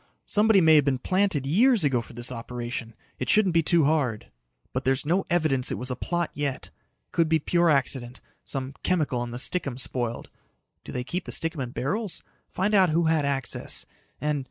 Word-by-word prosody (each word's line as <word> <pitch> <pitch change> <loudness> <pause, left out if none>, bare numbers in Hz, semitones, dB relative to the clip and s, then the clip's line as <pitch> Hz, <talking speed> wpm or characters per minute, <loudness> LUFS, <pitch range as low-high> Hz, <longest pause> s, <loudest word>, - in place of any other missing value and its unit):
Somebody 210 -1 +4
may've 160 -3 +6
been 135 -2 +1
planted 185 -3 0
years 220 - +4
ago 135 -5 +2
for 120 - -13
this 120 +2 -1
operation. 120 -1 -6 0.2
It 130 - -3
shouldn't 205 -5 +4
be 165 - +4
too 165 -1 +3
hard. 140 -8 0 0.4
"But 130 - -2
there's 135 +1 +1
no 180 +5 0
evidence 155 -7 +2
it - - -2
was 125 +1 0
a - - -2
plot 175 +5 -2
yet. 145 -2 -4 0.4
Could 165 -2 +1
be 160 - +4
pure 170 +2 +1
accident 130 -3 0 0.2
some 135 0 -3
chemical 150 -9 0
in 120 - -4
the 120 - -6
stickum 140 -1 0
spoiled. 120 -2 -3 0.5
Do - - -9
they 125 - -3
keep 175 +7 -4
the - - -6
stickum 165 -3 -1
in 125 - -4
barrels? 180 - -2 0.3
Find 195 +3 -1
out 190 -3 +5
who 165 +2 +2
had 160 -2 +2
access. 135 -3 0 0.3
And 150 -1 -1
145 Hz, 190 wpm, -26 LUFS, 125-175 Hz, 0.5 s, may've